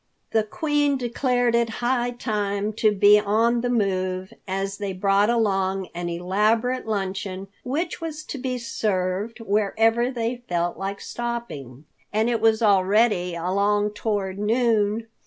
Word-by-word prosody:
The 220 - +3
Queen 290 +5 0
declared 245 -1 0
it 235 -1 +2
high 245 0 0
time 210 -3 -2
to 215 0 +3
be 205 +1 +6
on 225 +3 +2
the 245 - -1
move, 190 -4 -1
as 195 +1 -3
they 205 - -3
had 185 -1 -5
brought 200 +2 +3
along 195 -5 0
an 175 0 -4
elaborate 215 +8 0
luncheon 195 -2 -3
which 325 +8 -3
was 310 -2 -5
to 285 - -6
be 255 0 -2
served 210 -1 -2
wherever 225 +3 +2
they 240 -1 -2
felt 175 0 0
like 195 +1 -5
stopping, 160 - -6 0.3
and 220 +3 +1
it 230 - 0
was 225 0 +3
already 195 -2 +3
along 200 +4 +1
toward 205 -2 -2
noon. 220 -1 +1
210 Hz, 140 wpm, -24 LUFS, 195-235 Hz, 0.3 s, be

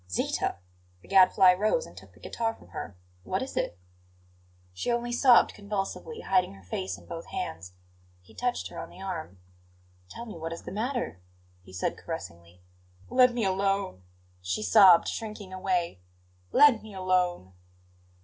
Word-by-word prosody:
"Zita!" 90 - -1 0.5
The - - -17
Gadfly 185 -1 +6
rose 210 +4 +1
and 85 - -14
took 95 -1 -14
the - - -19
guitar 225 - -3
from - - -19
her - - -5
hand. - - -14 0.3
"What - - -2
is - - -8
it?" 85 - -2 1.0
She 90 - -2
only 240 0 -1
sobbed 245 0 +5
convulsively, 205 - -5
hiding 185 - +1
her 95 - -16
face 95 0 -4
in 85 - -17
both - - -8
hands. 85 +3 -5 0.5
He 90 - -20
touched 245 0 -2
her - - -8
on - - -7
the - - -15
arm. 170 - -6 0.7
"Tell 235 - -8
me 220 - -9
what 165 +1 -4
is 170 - -9
the - - -7
matter," 225 - -3 0.4
he 90 - -16
said 95 - -2
caressingly. 85 +1 -8 0.5
"Let 250 0 +6
me 240 -3 -1
alone!" 195 - 0 0.4
she 90 - -2
sobbed, 195 -6 +7
shrinking 210 -4 -6
away. 180 - -1 0.5
"Let 285 -7 +6
me 215 -2 -11
alone!" 180 - 0
185 Hz, 160 wpm, -28 LUFS, -, 1.0 s, sobbed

